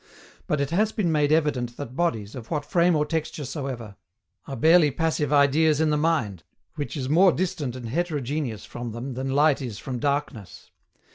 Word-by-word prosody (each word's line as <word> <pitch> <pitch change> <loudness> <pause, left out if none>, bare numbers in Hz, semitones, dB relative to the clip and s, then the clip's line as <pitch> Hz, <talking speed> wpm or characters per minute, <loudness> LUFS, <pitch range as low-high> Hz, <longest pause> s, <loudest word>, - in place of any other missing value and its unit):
But 150 - 0
it 140 +1 -1
has 210 +5 +2
been 195 -8 0
made 150 -1 +2
evident 135 -7 +1
that 130 -3 -7
bodies, 115 -11 -1
of 120 -4 -9
what 150 -3 -2
frame 175 +1 +3
or 150 0 +1
texture 155 -2 -3
soever, 125 -8 -6 0.5
are 135 - -5
barely 160 +1 +5
passive 155 +1 -1
ideas 150 +2 +4
in 155 -1 +2
the - - +2
mind, 150 - 0 0.3
which 150 0 -5
is 130 -2 -3
more 175 +6 +5
distant 170 -9 -2
and 125 -2 -7
heterogeneous 145 - -2
from 120 -2 -7
them 125 +3 -5
than 130 +2 -4
light 145 +1 +3
is 120 -6 -5
from 125 +1 -5
darkness. 140 -7 -3
145 Hz, 185 wpm, -25 LUFS, 125-160 Hz, 0.5 s, barely